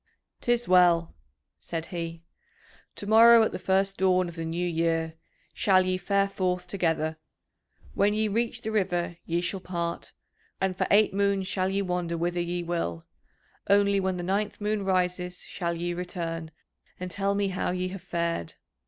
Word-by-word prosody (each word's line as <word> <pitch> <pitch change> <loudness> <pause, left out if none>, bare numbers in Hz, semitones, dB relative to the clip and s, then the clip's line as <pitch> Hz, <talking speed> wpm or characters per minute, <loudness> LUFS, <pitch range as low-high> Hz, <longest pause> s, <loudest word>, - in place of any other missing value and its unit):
"'Tis 240 0 +1
well," 175 -2 +4 0.5
said 165 -1 -4
he. 165 -1 -5 0.7
"To - - -7
morrow, 225 +2 +8
at - - 0
the - - -5
first 195 +1 +1
dawn 185 -1 +3
of 170 - -8
the 165 -1 -4
new 170 +2 -2
year, 165 -1 0 0.4
shall 185 -2 +3
ye 185 0 +1
fare 200 +2 +1
forth 180 -2 -2
together; 160 -4 -1 0.7
when 205 +1 +2
ye 215 0 +1
reach 230 +3 -1
the 220 - -2
river 175 -5 -1
ye 170 +1 0
shall 180 +2 -2
part, 170 -2 -4 0.5
and 190 -1 0
for - - 0
eight 210 0 +4
moons 200 -1 +1
shall 185 -1 0
ye 200 +1 0
wander 180 -2 -2
whither 175 +1 -1
ye 175 0 -2
will; 165 - -3 0.6
only, 200 0 +4
when 190 -1 -1
the 175 - -4
ninth 200 +3 -1
moon 210 -1 -1
rises, 180 -1 -1
shall 170 -2 -3
ye 175 +1 -2
return 170 -2 -4 0.5
and 180 0 -5
tell 200 +2 0
me 200 -1 +1
how 185 - -2
ye 185 0 -2
have 190 0 -7
fared. 170 - -2
180 Hz, 170 wpm, -27 LUFS, 170-195 Hz, 0.7 s, morrow